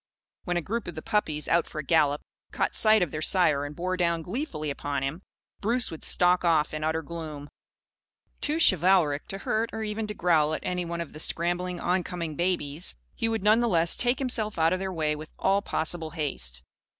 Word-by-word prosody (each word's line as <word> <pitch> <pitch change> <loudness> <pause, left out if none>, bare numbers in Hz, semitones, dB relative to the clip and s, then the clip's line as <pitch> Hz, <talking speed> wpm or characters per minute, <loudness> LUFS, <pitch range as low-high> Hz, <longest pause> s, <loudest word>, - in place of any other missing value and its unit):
When 175 -1 0
a 175 - -1
group 230 +6 -3
of 175 - -6
the 155 - -6
puppies, 155 -8 0
out 170 0 +2
for - - -10
a 150 - -2
gallop, 150 -2 +3 0.3
caught - - 0
sight 215 -3 +5
of 165 - -3
their 155 - -4
sire 155 -5 +3
and 145 +1 -7
bore 185 +3 -1
down 170 -2 +1
gleefully 180 - -3
upon 140 -1 -3
him, 145 +7 -3 0.4
Bruce 235 +4 0
would 160 - -7
stalk 180 0 +3
off 160 -3 +2
in 155 0 -3
utter 160 +1 0
gloom. 155 -3 -7 0.9
Too 300 +2 0
chivalric 180 - +4
to 195 - -4
hurt 220 +3 -1
or 220 - -4
even 215 0 -3
to 210 - -5
growl 155 -3 +3
at - - -6
any 180 -1 -2
of 170 -2 -4
the 155 - -9
scrambling 175 +2 -2
oncoming 175 -3 -1
babies, 170 - -1 0.2
he 225 - -1
would 225 -3 -1
none 215 +2 +5
the 240 -1 +2
less 170 -3 +2
take 245 +1 +1
himself 235 -5 -1
out 165 +1 +3
of 185 - -1
their 190 0 -3
way 155 -3 0
with 155 +1 -9
all 195 +1 +2
possible 160 -3 -1
haste. 100 - -4
170 Hz, 205 wpm, -27 LUFS, 155-195 Hz, 0.9 s, sight